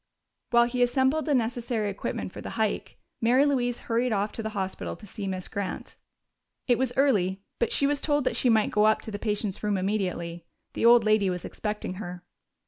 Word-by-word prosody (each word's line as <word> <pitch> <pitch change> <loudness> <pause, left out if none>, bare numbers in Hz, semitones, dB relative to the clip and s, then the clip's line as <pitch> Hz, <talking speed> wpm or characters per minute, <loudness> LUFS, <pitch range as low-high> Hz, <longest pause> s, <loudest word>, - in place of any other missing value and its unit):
While 235 -1 +5
he 245 +1 -2
assembled 265 +5 +2
the 290 - +3
necessary 230 -3 -1
equipment 190 -1 -4
for - - -8
the - - -6
hike, 220 -2 -1 0.2
Mary 250 +5 +4
Louise 245 -4 +1
hurried 235 +1 0
off 205 0 0
to - - -5
the 220 - -3
hospital 190 -1 -3
to - - -13
see 200 0 -6
Miss 185 -1 -3
Grant. 200 -2 -5 0.7
It 245 -2 +3
was 260 -2 +1
early, 195 -9 +2 0.2
but 235 - +1
she 280 - +2
was 285 0 +1
told 290 -2 +2
that - - 0
she 250 - +2
might 220 -2 +3
go 210 0 +3
up 215 - +3
to 220 - -6
the 205 - -5
patient's 210 -3 -2
room 210 -2 0
immediately. 180 -4 -2 0.3
The 230 - +2
old 240 -1 +7
lady 215 -2 +3
was 180 -1 -4
expecting 210 -3 -4
her. 175 -1 -7
220 Hz, 205 wpm, -27 LUFS, 200-245 Hz, 0.7 s, old